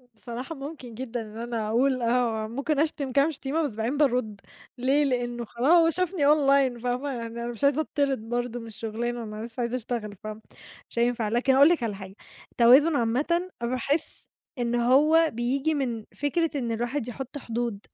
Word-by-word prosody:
بصراحة 245 +7 -7
ممكن 275 -4 -8
جدًا 240 0 -4
إن 215 0 -10
أنا 230 -2 -3
أقول 255 +3 +2
آه، 230 -2 +1
ممكن 275 +5 -1
أشتم 295 -3 -1
كام 280 +5 +3
شتيمة 295 +3 -2
بس 270 -8 -3
بعدين 230 +6 -1
بارُد، 250 -8 +1 0.4
ليه 270 +4 +2
لإنه 240 -3 -1
خلاص 325 +8 +3
شافني 365 -4 0
Online، 275 -4 +3
فاهمة، 250 +3 -1
يعني 235 -3 -4
أنا 235 +1 -5
مش 240 +2 -6
عايزة 280 +2 +4
أتطرد 275 -7 -1
برضو 245 0 -2
من 230 - -9
الشغلانة، 230 +2 -4
أنا 215 +1 -6
لسّه 235 +1 -6
عايزة 235 +1 -1
أشتغل، 230 -4 -4
فاهمة، 215 0 -7 0.5
مش 235 - -4
هينفع، 235 -2 +1
لكن 250 +4 +2
أقول 280 +3 +7
لك 340 -7 +1
على 215 -3 -2
حاجة، 195 0 -10 0.4
التوازن 270 +7 +6
عامةً 300 +10 0
باحس 255 +6 -2 0.3
إن 240 0 0
هو 300 +7 +4
بييجي 265 +7 0
من 240 -6 -2
فكرة 320 +3 0
إن 240 -5 -2
الواحد 240 +3 -2
يحط 265 +3 -6
حدود، 235 -4 -3
245 Hz, 175 wpm, -26 LUFS, 230-280 Hz, 0.5 s, أقول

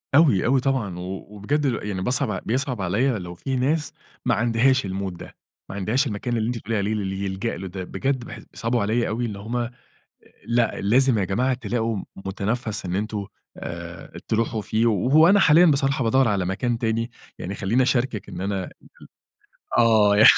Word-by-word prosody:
أوي، 140 - +5
أوي 130 +2 +3
طبعًا، 125 -9 -1
و 95 +2 -6
وبجد 120 +9 -1
ل 115 -5 -2
يعني 95 -3 -3
باصعب 125 -3 +1
بيصعب 125 -1 -1
عليَّ 100 +9 +1
لو 90 -1 -7
في 130 +10 -3
ناس 145 +4 0 0.3
ما - - +3
عندهاش 120 +1 +2
الmood 95 +1 -3
ده، - - -11 0.3
ما - - -6
عندهاش 110 +9 +1
المكان 120 +2 -2
اللي 110 0 0
أنتِ 120 - -2
بتقولِي 110 0 -2
عليه 100 +2 0
اللي 100 -2 -2
يلجأ 95 +4 -3
له 95 - -6
ده 95 +1 -6
بجد 135 +6 -2
باحس - - -9
بيصعبوا 115 +1 -1
عليَّ 115 +3 +1
أوي 120 +3 -1
اللي 105 -4 -5
هم 115 +4 -3
أ 120 0 -2 0.8
لأ، 120 -1 +1
لازم 125 +3 +4
يا 100 - +1
جماعة 125 +8 +1
تلاقوا 115 -2 -2
م 95 - -5
متنفّس 105 +3 -3
إن 90 - -2
أنتم 105 0 -3 0.3
آآ، 85 0 -8
تروحوا 110 0 0
فيه 110 +2 0
وهو 130 - +5
أنا 200 +2 +6
حاليًا 170 0 +7
بصراحة 135 -3 +2
بادوّر 130 +2 +3
على 100 -3 +1
مكان 115 +6 -1
تاني، 115 0 -1 0.3
يعني 95 - -5
خليني 105 +6 +1
أشاركِك 125 -5 0
إن - - -7
أنا 95 -1 -2
ال - - -9 1.1
ال - - +8
آه، 110 -3 +5
ي 110 - +7
115 Hz, 190 wpm, -24 LUFS, 100-125 Hz, 1.1 s, ال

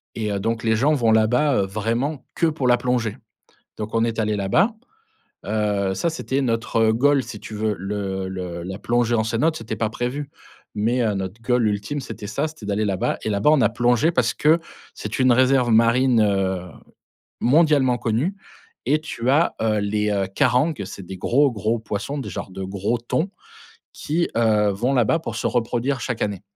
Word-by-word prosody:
et 105 -2 -2
heu, 100 - -1
donc 115 +2 -2
les 110 -1 +2
gens 140 +8 +3
vont 120 -6 +2
là-bas, 125 +6 +3
heu, - - -1
vraiment 115 +9 -2
que 165 - +2
pour 150 -5 -1
la 120 - +6
plongée, 120 -3 -1 0.6
donc 110 0 -5
on 115 0 +3
est 115 -1 -2
allé 110 -1 0
là-bas. 105 - +2 0.7
Heu, 105 -2 0
ça, 170 - 0
c'était 140 -4 -2
notre, 115 -2 -1
heu, 110 0 +4
goal 140 +4 +3
si 105 - -8
tu 105 +1 -9
veux 105 0 -1
le 95 0 -3
le 90 -2 -5
la 95 +3 -6
plongée 120 +1 +1
en 110 - +1
cénote, 125 +9 +1
c'était 115 -1 -5
pas 110 0 -1
prévu, 130 +5 -4 0.5
mais 120 +4 +1
heu, 110 -3 +1
notre 95 +3 -5
goal 125 -1 +2
ultime, 105 +7 -2
c'était 105 -5 -8
ça, 105 +9 -1
c'était 155 -9 -11
d'aller 105 +1 0
là-bas 95 -3 -1
et - - -1
là-bas, 100 +7 +3
on 155 -2 +4
a - - +4
plongé 120 +7 +2
parce 125 -6 +1
que 160 +3 +3 0.3
c'est - - -5
une 130 -1 +5
réserve 130 0 +3
marine, 115 +2 +4
heu, 95 -3 0 0.8
mondialement 140 -2 +4
connue 120 - -1 0.5
et 150 +3 +3
tu 125 -5 -3
as, 155 +5 +3
heu, 110 -1 +1
les 105 -1 0
carangues, 130 -1 +2
c'est 95 0 -9
des 95 +2 -8
gros 135 +9 +2
gros 110 +1 -1
poissons 110 +6 -4
des 135 - -5
genre - - -6
de 95 - -6
gros 100 +5 -1
thons 155 +10 -2 0.6
qui, 170 +3 -1
heu, 110 -2 +3
vont 115 +7 -1
là-bas 125 +5 +3
pour 115 -9 -6
se - - -1
reproduire 125 +2 -1
chaque 120 -3 -3
année 100 -3 -2
115 Hz, 190 wpm, -22 LUFS, 105-130 Hz, 0.8 s, la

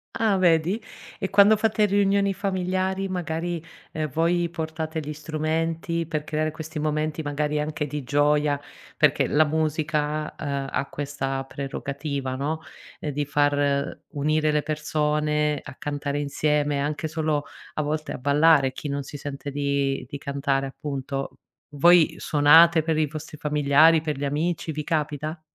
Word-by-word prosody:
Ah, 220 -3 +2
vedi. 175 +3 +2 0.4
E 190 - -2
quando 205 +2 +6
fate 215 0 +2
riunioni 200 0 +2
familiari, 190 0 -1
magari, 170 -2 -3 0.3
ehm, 155 -1 -2
voi 170 +3 +1
portate 160 -1 -4
gli 150 0 -5
strumenti 160 +2 -2
per 155 -1 -3
creare 155 0 -1
questi 160 +1 -7
momenti 155 +1 -1
magari 150 0 -1
anche 150 0 -3
di 150 0 -5
gioia, 145 +1 +2 0.4
perché - - +3
la 155 +1 +4
musica, 155 0 -1
uhm, 140 -2 -3
a 140 - -2
questa 135 -2 -3
prerogativa, 140 0 -4
no: 150 +4 -2 0.4
uhm, 150 - -4
di 145 +1 -1
far 145 0 +1
unire 155 +1 +1
le 150 -1 +1
persone 150 -1 0
a 140 - -10
cantare 145 0 -3
insieme, 145 0 0
anche 150 +1 -2
solo 155 -2 -1 0.3
a - - 0
volte 155 +1 -2
a - - -4
ballare, 145 0 +4
chi 145 - -6
non 140 0 -2
si 135 - -10
sente 145 0 -6
di 140 -1 -1
di 145 - -5
cantare 140 -1 -1
appunto. 135 -1 -5 0.4
Voi 170 +3 +5
suonate 160 +3 +6
per 160 0 0
i 155 -1 +2
vostri 155 +1 -8
familiari, 150 +2 +4
per 150 -3 -3
gli 145 - -2
amici, 160 +3 -1
vi 150 +1 -4
capita? 155 +1 -2
150 Hz, 150 wpm, -25 LUFS, 145-160 Hz, 0.4 s, quando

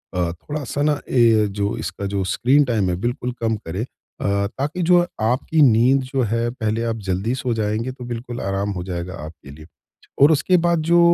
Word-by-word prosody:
अ, 85 -1 0
थोड़ा-सा 145 - -5
न 150 -1 +2
ये 115 -4 +4
जो 100 +2 -2
इसका 100 -3 -5
जो 100 -1 0
स्क्रीन 130 +9 +3
टाइम 110 -7 0
है 90 - 0
बिल्कुल 120 +1 -2
कम 115 -1 +1
करें 95 0 -5
अ, 100 -5 -3
ताकि 145 - -4
जो 175 +1 +5 0.2
आपकी 130 +7 +1
नींद 125 +1 +5
जो 130 +1 -2
है 115 +1 0
पहले 110 -2 -2
आप 115 -1 -1
जल्दी 95 +6 0
सो 130 -2 -2
जाएँगे, 110 +3 -1
तो 125 -1 -10
बिल्कुल 120 0 -5
आराम 100 +1 -2
हो 90 - -4
जाएगा 90 0 -5
आपके 75 -3 -12
लिए। 75 +2 -12 0.6
और 145 +3 +8
उसके 160 +4 +3
बाद 170 -2 +2
जो 170 0 +6
115 Hz, 195 wpm, -21 LUFS, 100-135 Hz, 0.6 s, और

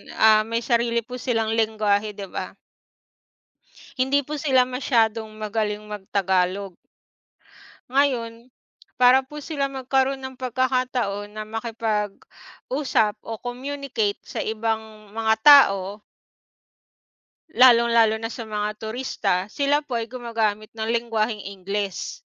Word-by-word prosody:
ah 215 0 +5
may 230 +1 -2
sarili 235 -1 +1
po 250 +2 -8
silang 225 -3 0
lengwahe, 215 -2 +1
di 200 - -7
ba? - - -5 1.4
Hindi 275 +2 +2
po 295 +2 -5
sila 265 -4 +4
masyadong 230 -4 0
magaling 215 -1 -2
mag 210 -2 -8
tagalog. 190 0 +1 1.2
Ngayon, 250 -3 0 0.5
para 255 +1 +6
po 300 +2 -9
sila 285 -2 -2
magkaroon 270 0 0
ng 260 0 -7
pagkakataon 250 -5 -1
na 215 - -5
makipag-usap 225 +2 -2
o 225 -1 -6
communicate 250 -4 -3
sa - - -5
ibang 220 -1 -3
mga 220 +1 +1
tao 205 -8 +6 1.6
lalong-lalo 235 -3 +5
na 225 - -3
sa 230 -1 -7
mga 210 -1 -2
turista 220 -2 -2 0.2
sila 285 +4 +1
po 260 -5 -4
ay 230 - -2
gumagamit 225 -3 -2
ng 220 - -2
lengwaheng 225 -2 -1
Ingles. 195 0 -4
225 Hz, 115 wpm, -23 LUFS, 215-255 Hz, 1.6 s, para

